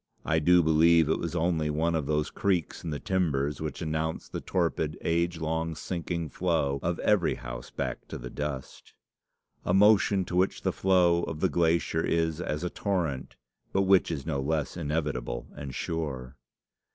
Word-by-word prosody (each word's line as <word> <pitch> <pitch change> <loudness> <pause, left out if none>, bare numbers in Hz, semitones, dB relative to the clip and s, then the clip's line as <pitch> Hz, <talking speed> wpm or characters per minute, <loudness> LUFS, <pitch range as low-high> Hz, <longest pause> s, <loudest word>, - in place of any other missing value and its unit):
I 80 - +2
do 90 +3 +5
believe 80 +1 +5
it 80 - +1
was 85 0 -3
only 80 -2 +1
one 80 +3 +1
of 80 -4 -1
those 75 0 0
creaks 90 -6 -1
in 85 - -4
the 75 -2 -3
timbers 75 -7 0
which 80 +1 -4
announce 80 0 -2
the - - -5
torpid, 80 -4 -1
age 85 0 0
long, 80 0 -2
sinking 85 0 -3
flow 70 -4 0
of 85 0 -1
every 105 -5 +2
house - - -7
back - - -4
to - - -6
the - - -8
dust 75 -3 -6 0.7
a - - +1
motion 100 -1 +5
to 90 - -5
which 95 +2 +1
the - - +1
flow 90 -3 +3
of 80 - -5
the - - +2
glacier 85 -1 +1
is 80 0 0
as 75 -2 -3
a 90 - -1
torrent, 85 -10 -2 0.4
but 95 - +3
which 95 -1 +4
is 75 -5 -4
no 75 -4 -1
less 75 +1 -1
inevitable 75 -7 -2
and 70 -3 -7
sure. 70 -6 -4
80 Hz, 175 wpm, -28 LUFS, 75-85 Hz, 0.7 s, do